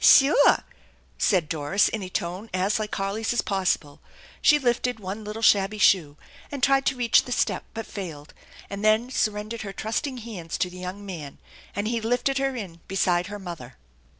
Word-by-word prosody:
" -, -, -8 dB
Soor! 285 Hz, +1 st, +6 dB, 0.3 s
" -, -, -32 dB, 0.3 s
said 180 Hz, -7 st, +2 dB
Doris 155 Hz, +5 st, +2 dB
in 220 Hz, -, -3 dB
a 185 Hz, -, -6 dB
tone 180 Hz, +5 st, -4 dB
as 195 Hz, +3 st, +1 dB
like 215 Hz, -1 st, -3 dB
Harley's 205 Hz, +4 st, -1 dB
as 240 Hz, -, +2 dB
possible. 185 Hz, -7 st, -1 dB, 0.4 s
She 295 Hz, -, +6 dB
lifted 245 Hz, -3 st, 0 dB
one 200 Hz, +2 st, -6 dB
little 210 Hz, +2 st, -6 dB
shabby 200 Hz, 0 st, +4 dB
shoe, 165 Hz, -8 st, +3 dB, 0.3 s
and 280 Hz, -3 st, -6 dB
tried 275 Hz, 0 st, +4 dB
to 270 Hz, -, +2 dB
reach 245 Hz, -2 st, +3 dB
the 250 Hz, -, -8 dB
step, -, -, 0 dB
but 225 Hz, 0 st, -4 dB
failed, 160 Hz, -7 st, -8 dB, 0.3 s
and 200 Hz, +1 st, -6 dB
then 220 Hz, +4 st, +3 dB
surrendered 215 Hz, 0 st, -1 dB
her 195 Hz, -2 st, -6 dB
trusting 230 Hz, +6 st, -3 dB
hands 210 Hz, -8 st, -6 dB
to 180 Hz, -, -1 dB
the 180 Hz, -, -10 dB
young 185 Hz, +3 st, -6 dB
man; 160 Hz, -8 st, -7 dB, 0.4 s
and 205 Hz, +2 st, -1 dB
he 230 Hz, 0 st, -1 dB
lifted 245 Hz, +4 st, +1 dB
her 270 Hz, -1 st, 0 dB
in 185 Hz, -8 st, -7 dB
beside 180 Hz, -2 st, +1 dB
her 205 Hz, 0 st, -6 dB
mother. 170 Hz, -10 st, -9 dB
205 Hz, 190 wpm, -25 LUFS, 180-230 Hz, 0.4 s, Soor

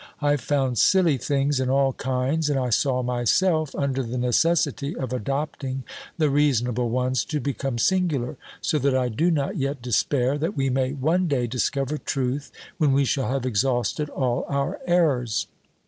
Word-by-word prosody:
I 145 Hz, -1 st, +2 dB
found 135 Hz, -3 st, 0 dB
silly 175 Hz, -7 st, +4 dB
things 140 Hz, 0 st, 0 dB
in 130 Hz, -1 st, 0 dB
all 135 Hz, 0 st, +2 dB
kinds, 130 Hz, +5 st, -1 dB
and 140 Hz, -2 st, +1 dB
I 125 Hz, -2 st, -1 dB
saw 130 Hz, +2 st, +1 dB
myself 140 Hz, -, +1 dB
under 135 Hz, -2 st, -1 dB
the 125 Hz, 0 st, -4 dB
necessity 140 Hz, +3 st, +1 dB
of 130 Hz, -1 st, -4 dB
adopting 135 Hz, +1 st, -3 dB, 0.3 s
the 155 Hz, -3 st, +2 dB
reasonable 125 Hz, -4 st, +1 dB
ones 125 Hz, +1 st, 0 dB
to 150 Hz, -, -2 dB
become 135 Hz, -2 st, -3 dB
singular; 155 Hz, -4 st, +1 dB, 0.3 s
so 150 Hz, -, 0 dB
that 140 Hz, -1 st, +1 dB
I 125 Hz, -1 st, 0 dB
do 155 Hz, +10 st, +1 dB
not 145 Hz, -5 st, -1 dB
yet 140 Hz, 0 st, -2 dB
despair 125 Hz, +3 st, 0 dB
that 155 Hz, 0 st, -2 dB
we 135 Hz, -1 st, +1 dB
may 130 Hz, +1 st, 0 dB
one 160 Hz, +6 st, +1 dB
day 135 Hz, -5 st, 0 dB
discover 135 Hz, +4 st, -1 dB
truth, 135 Hz, +1 st, -2 dB, 0.3 s
when 145 Hz, -3 st, +3 dB
we 140 Hz, 0 st, +3 dB
shall 135 Hz, -2 st, 0 dB
have 130 Hz, -1 st, -1 dB
exhausted 130 Hz, +5 st, 0 dB
all 125 Hz, -4 st, -1 dB
our 140 Hz, +6 st, -1 dB
errors. 140 Hz, -10 st, +2 dB
135 Hz, 165 wpm, -24 LUFS, 125-145 Hz, 0.3 s, silly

